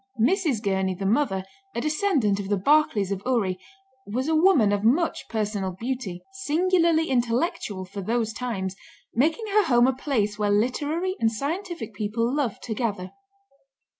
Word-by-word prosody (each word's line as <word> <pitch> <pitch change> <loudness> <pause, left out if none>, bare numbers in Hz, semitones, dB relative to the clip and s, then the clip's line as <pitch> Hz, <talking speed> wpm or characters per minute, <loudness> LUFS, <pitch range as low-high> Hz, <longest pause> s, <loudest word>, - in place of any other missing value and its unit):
Mrs. 285 - +2
Gurney, 190 -2 0
the 195 +2 -5
mother, 200 -3 +1 0.3
a 235 - -1
descendant 300 - +1
of 195 -1 -5
the 205 - +2
Barclays 215 -4 +3
of 195 -1 -2
Ury, 205 -8 0 0.5
was 250 +7 -2
a 320 - +1
woman 310 - +5
of 205 0 0
much 295 +10 +1
personal 205 -4 -2
beauty, 225 -3 -4
singularly 340 -2 +2
intellectual 240 - -1
for 200 +2 -7
those 225 +2 -1
times, 195 -6 -3 0.4
making 320 - +1
her 425 0 +4
home 240 -1 +4
a 265 - +3
place 220 -6 -1
where 205 -1 +1
literary 290 - 0
and 225 -1 +2
scientific 330 - -4
people 220 +4 -1
loved 275 -8 -2
to 225 - -3
gather. 205 -5 -3
235 Hz, 155 wpm, -25 LUFS, 205-305 Hz, 0.5 s, woman